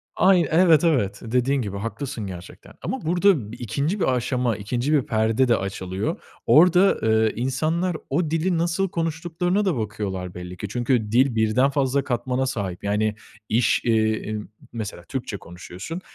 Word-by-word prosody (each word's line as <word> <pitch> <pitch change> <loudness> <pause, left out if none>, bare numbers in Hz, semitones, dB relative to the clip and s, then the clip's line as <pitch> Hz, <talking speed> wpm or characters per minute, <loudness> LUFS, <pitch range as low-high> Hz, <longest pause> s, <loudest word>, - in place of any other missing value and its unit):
Aynı 180 -5 +4
evet, 165 -2 +5
evet 105 - +1
dediğin 125 +3 +1
gibi 100 -2 -4
haklısın 115 0 -5
gerçekten 90 0 -10
ama 265 - -3
burada 180 +3 +4 0.2
2'nci 140 - -2
bir 130 - +2
aşama 125 -2 0
2'nci 120 +8 -1
bir 145 - +4
perde 110 +3 +1
de 120 - +4
açılıyor. 95 0 -4 0.2
Orada, 180 +4 +5
eee, 110 0 +3
insanlar 155 +8 -1
o 155 +2 0
dili 165 +2 +1
nasıl 175 +3 0
konuştuklarına 175 +4 -1
da 170 -9 +1
bakıyorlar 100 -4 -4
belli 90 0 -8
ki. 105 - -5
Çünkü 120 -2 0
dil 125 0 +3
birden 110 +5 +3
fazla 140 0 +1
katmana 130 +1 -1
sahip. 100 -9 -4
Yani 105 +1 0 0.3
iş, 115 +1 +2
iii, 110 -1 +1 0.3
mesela 105 -6 -6
Türkçe 110 +1 -5
konuşuyorsun, 90 - -8
125 Hz, 150 wpm, -23 LUFS, 105-160 Hz, 0.3 s, evet